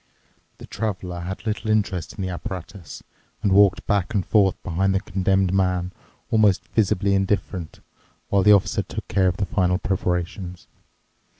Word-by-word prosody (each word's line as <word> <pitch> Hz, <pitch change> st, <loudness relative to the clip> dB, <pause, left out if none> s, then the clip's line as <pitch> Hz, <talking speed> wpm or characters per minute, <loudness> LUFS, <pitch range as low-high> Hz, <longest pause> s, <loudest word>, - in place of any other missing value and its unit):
The -, -, -10 dB
Traveler 95 Hz, -5 st, -4 dB
had 95 Hz, +5 st, -6 dB
little 110 Hz, 0 st, -2 dB
interest 100 Hz, -5 st, 0 dB
in 100 Hz, -, -5 dB
the 95 Hz, -, -2 dB
apparatus 90 Hz, 0 st, -7 dB, 0.4 s
and 100 Hz, -, +2 dB
walked 100 Hz, -1 st, +4 dB
back 100 Hz, +1 st, 0 dB
and 95 Hz, -, +1 dB
forth 100 Hz, -4 st, +3 dB
behind 95 Hz, +3 st, 0 dB
the -, -, +3 dB
Condemned 95 Hz, -1 st, 0 dB
Man, 90 Hz, -1 st, +1 dB, 0.4 s
almost 105 Hz, -4 st, +3 dB
visibly 100 Hz, -2 st, +1 dB
indifferent, 95 Hz, -3 st, -2 dB, 0.5 s
while 100 Hz, -, +3 dB
the 105 Hz, +3 st, +6 dB
Officer 100 Hz, -, +2 dB
took -, -, -7 dB
care 95 Hz, -1 st, +2 dB
of 90 Hz, 0 st, 0 dB
the 100 Hz, -, 0 dB
final 90 Hz, -1 st, +1 dB
preparations. 90 Hz, -1 st, -3 dB
95 Hz, 155 wpm, -23 LUFS, 90-100 Hz, 0.5 s, the